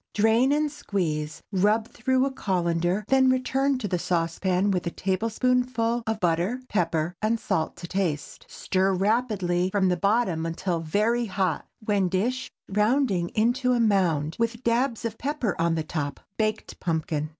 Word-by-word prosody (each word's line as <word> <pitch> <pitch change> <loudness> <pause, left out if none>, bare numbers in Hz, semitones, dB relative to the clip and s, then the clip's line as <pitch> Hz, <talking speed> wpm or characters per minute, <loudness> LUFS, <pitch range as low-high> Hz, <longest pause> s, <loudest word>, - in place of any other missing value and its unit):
Drain 225 +5 +4
and 300 0 +1
squeeze, 155 - -3
rub 210 +3 +2
through 260 +1 +1
a 275 - -1
cullender, 175 -3 0
then 265 -1 +5
return 265 +1 +1
to 235 -5 -3
the 180 -2 -1
saucepan 180 +3 0
with 180 -2 -1
a - - +2
tablespoonful 230 +5 0
of 220 -1 -1
butter, 175 +6 +1
pepper, 170 -4 0
and 220 +1 +1
salt 160 -6 -1
to 175 0 -8
taste. 165 -6 -3
Stir 190 0 0
rapidly 195 -4 +1
from 190 -1 +2
the 180 - +2
bottom 200 -4 +1
until 165 +1 -2
very 215 +9 +1
hot, 185 -4 -1 0.2
when 200 -4 +2
dish, 240 +8 -1 0.2
rounding 210 -3 +1
into 245 +3 +2
a 245 - +1
mound, 175 -9 +2
with 230 +1 -1
"dabs" 235 0 +1
of 225 -1 -4
pepper 265 -7 -1
on 165 0 +2
the 160 - -1
top. 145 -3 -4 0.2
BAKED 215 0 -2
PUMPKIN. 155 -3 -2
200 Hz, 155 wpm, -26 LUFS, 175-235 Hz, 0.2 s, then